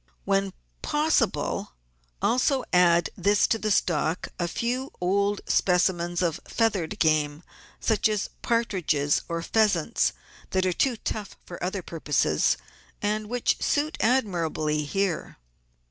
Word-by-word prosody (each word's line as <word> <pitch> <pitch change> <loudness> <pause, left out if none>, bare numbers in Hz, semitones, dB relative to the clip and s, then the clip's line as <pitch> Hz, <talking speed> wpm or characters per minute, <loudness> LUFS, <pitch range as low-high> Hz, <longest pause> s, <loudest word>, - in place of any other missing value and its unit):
When 195 0 +1 0.3
possible 300 - 0 0.5
also 255 +2 +2
add 175 -1 +4
to 205 +3 +3
this 215 -2 +1
stock 160 0 0
a 175 - 0
few 250 - -2
old 200 +3 +1
specimens 175 -1 +1
of 165 -3 0
feathered 205 -8 0
game, 155 0 +1 0.4
such 220 -1 +2
as 210 -2 -2
partridges 180 -11 +1
or 170 0 -2
pheasants 215 -1 +2 0.4
that 185 0 +1
are 185 - +1
too 250 +5 +1
tough 210 -1 -5
for 175 - -8
other 185 +1 -2
purposes 145 - +1 0.4
and 210 0 -1
which 245 0 0
suit 300 +1 0
admirably 170 - +1
here. 195 +2 -2
190 Hz, 115 wpm, -26 LUFS, 170-220 Hz, 0.5 s, add